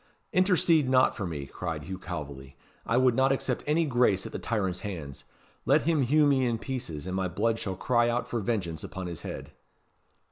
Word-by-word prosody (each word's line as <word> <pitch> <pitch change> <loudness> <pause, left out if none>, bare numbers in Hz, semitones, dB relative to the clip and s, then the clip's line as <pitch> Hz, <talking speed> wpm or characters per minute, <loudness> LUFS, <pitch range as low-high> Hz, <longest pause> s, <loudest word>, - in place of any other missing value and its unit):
"Intercede 175 -6 +3
not 130 0 +4
for 100 -6 -3
me," 75 -4 -5
cried 80 +1 -5
Hugh 95 +5 -6
Calveley. 70 -7 -7 0.3
"I 115 - +2
would 130 -1 +4
not 130 +2 +3
accept 130 -2 -1
any 160 +2 +2
grace 120 -8 +2
at - - -6
the - - -5
tyrant's 95 -6 -1
hands. 80 - -7 0.4
Let 145 +2 +3
him 160 -2 +2
hew 150 +4 +4
me 140 -2 +3
in 120 -2 +1
pieces, 110 - -5
and 95 0 -3
my 95 -1 0
blood 110 +6 0
shall 95 -4 -3
cry 120 +4 +2
out 120 +1 -1
for 120 - -2
vengeance 95 -7 -2
upon 95 0 -6
his 85 -3 -6
head." - - -7
115 Hz, 200 wpm, -28 LUFS, 90-130 Hz, 0.4 s, not